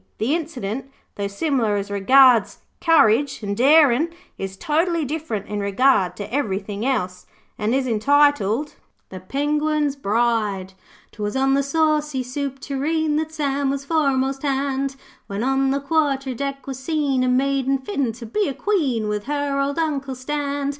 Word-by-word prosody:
The 235 +7 0
incident, 270 -7 -4 0.2
though 200 -1 -3
similar 225 0 0
as 200 0 -3
regards 245 +3 +5 0.2
courage 280 -6 +3
an' 200 -1 -2
darin', 285 +4 +4 0.3
is 195 0 -6
totally 330 - 0
different 280 -8 -4
in 210 0 -4
regard 200 -2 +2
to 210 +2 -7
everythin' 205 -5 -2
else, 185 -9 -2 0.3
and 215 +4 0
is 270 -1 +1
entitled 280 +1 +2 0.4
THE 185 - -8
PENGUIN'S 295 +6 0
BRIDE 210 -5 0 0.4
''Twas 210 +1 -4
on 270 0 +2
the 280 - +3
Saucy 300 -1 0
Soup 270 +2 -4
Tureen, 300 +3 -1
That 315 0 -2
Sam 280 -3 -1
was 275 0 -3
foremast 275 -3 +1
hand, 275 -1 -1 0.3
When 200 +3 -3
on 270 +1 +1
the 275 +1 +1
quarter 280 -3 0
deck 275 +1 -4
was 270 -2 -6
seen 280 -3 0
A - - +1
maiding 270 +1 +1
fit 265 - -2
to 235 -1 -9
be 400 - -1
a 270 - -5
Queen 275 - 0
With 210 -1 -3
her 285 0 -1
old 280 +2 -1
Uncle 280 -5 -1
stand. 285 +1 -2
270 Hz, 155 wpm, -22 LUFS, 225-290 Hz, 0.4 s, regards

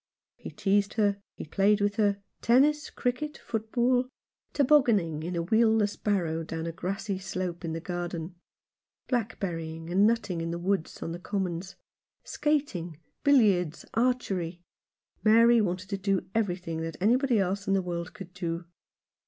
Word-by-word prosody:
He - - -9
teased 200 0 +1
her, 205 -2 +1 0.2
and 155 - -8
played 205 +1 +3
with 205 0 0
her 200 -2 +1
— - - -49
tennis, 290 +5 +3
cricket, 255 +5 -2
football; 245 +3 0 0.4
tobogganing 235 - +3
in 175 +3 -4
a 170 - 0
wheelless 220 +1 +3
barrow 170 -6 -1
down 160 0 -5
a 165 - -2
grassy 195 +3 -3
slope 185 -2 -4
in 165 -1 -3
the 165 - -3
garden; 175 -1 -4 0.7
blackberrying 170 -9 -3
and 195 +4 +5
nutting 215 -7 0
in 165 - -3
the 170 - -2
woods 185 -1 -1
and - - -8
on 165 - -4
the 170 - -5
commons; 185 -1 -3 0.5
skat 295 -3 0
ing, 170 -2 -5 0.3
billiards, 205 - +3
archery. 195 -8 0 0.6
Mary 230 +2 +6
wanted 185 -1 -2
to 195 - -2
do 195 -1 0
every 210 -6 +1
thing 165 -3 -5
that 165 -1 -5
anybody 245 +5 +3
else 195 +1 -1
in 195 - +3
the 195 - +2
world 170 +1 -4
could 190 -4 -10
do. 170 -1 -4
195 Hz, 160 wpm, -28 LUFS, 175-225 Hz, 0.7 s, Mary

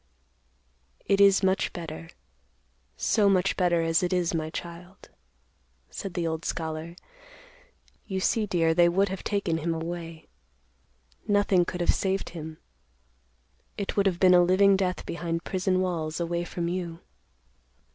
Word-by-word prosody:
"It 200 0 +2
is 200 0 +6
much 190 0 +1
better, 165 -1 -7 0.9
so 210 -3 +3
much 190 -1 +2
better, 175 -2 +2
as 165 0 +2
it 180 0 -1
is, 180 -2 0
my 155 -1 -2
child," 175 +3 -9 0.8
said 180 - -6
the 175 - -1
old 160 0 -3
scholar. 160 +1 -4 1.1
"You 190 -2 -2
see, 210 +3 +1
dear, 165 -4 +2
they 175 +1 +5
would 195 +3 +2
have 190 0 -5
taken 190 -6 -1
him 165 +1 -1
away. 165 0 -6 1.0
Nothing 205 -3 +3
could 180 0 -4
have 175 - +3
saved 195 0 -1
him. 160 -2 -8 1.2
It 200 - -3
would 200 -1 +3
have 180 -2 -1
been 185 -1 +6
a 180 - +7
living 190 +3 +5
death 185 -1 -1
behind 170 -1 -3
prison 185 0 0
walls 165 -4 -2
away 170 0 -2
from 175 -1 -4
you." 170 -2 -4
175 Hz, 145 wpm, -27 LUFS, 165-190 Hz, 1.2 s, a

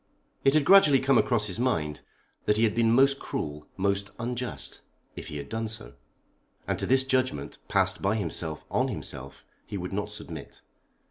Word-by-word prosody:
It 135 +2 +4
had 150 -2 +4
gradually 155 -8 +7
come 135 -1 +4
across 105 - +2
his 100 0 -4
mind 80 - 0 0.4
that 105 - +3
he 110 - +3
had 110 -2 +3
been 115 -1 +3
most 135 +3 +5
cruel, 75 0 -5
most 100 0 0
unjust, 125 +1 -4 0.3
if - - -7
he 75 - -6
had 70 -1 -6
done 110 +4 -3
so; - - -5 0.7
and - - -1
to - - -1
this 130 +1 +4
judgment, 130 - -1
passed 95 -2 +1
by 100 +2 +2
himself 80 -7 -3
on - - +2
himself, 70 +1 -6 0.2
he 100 - -4
would 90 0 -5
not 105 +1 -2
submit. 85 -7 -7
105 Hz, 180 wpm, -28 LUFS, 90-125 Hz, 0.7 s, gradually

